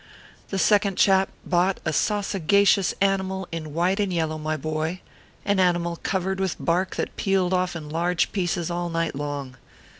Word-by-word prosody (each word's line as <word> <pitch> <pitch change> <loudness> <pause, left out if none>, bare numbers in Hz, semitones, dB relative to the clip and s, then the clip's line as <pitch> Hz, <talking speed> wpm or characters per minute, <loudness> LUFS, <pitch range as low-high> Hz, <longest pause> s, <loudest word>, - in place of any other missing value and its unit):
The 195 - -2
second 200 -1 +3
chap 190 -1 +4 0.2
bought 180 +2 +1
a 155 - +1
sausagacious 200 0 +2
animal 190 -1 0
in 160 -2 -5
white 180 +4 +1
and 200 -2 0
yellow, 160 -2 -1
my 155 0 -2
boy 155 +4 -3 0.5
an 200 -1 +2
animal 175 -2 +1
covered 190 0 -1
with 190 -2 0
bark 180 +2 0
that - - -3
pealed 190 -2 +1
off 180 -1 0
in 155 -3 -6
large 170 +3 0
pieces 175 -3 -1
all 175 0 -2
night 165 0 -1
long. 140 -2 -5
180 Hz, 160 wpm, -24 LUFS, 165-190 Hz, 0.5 s, chap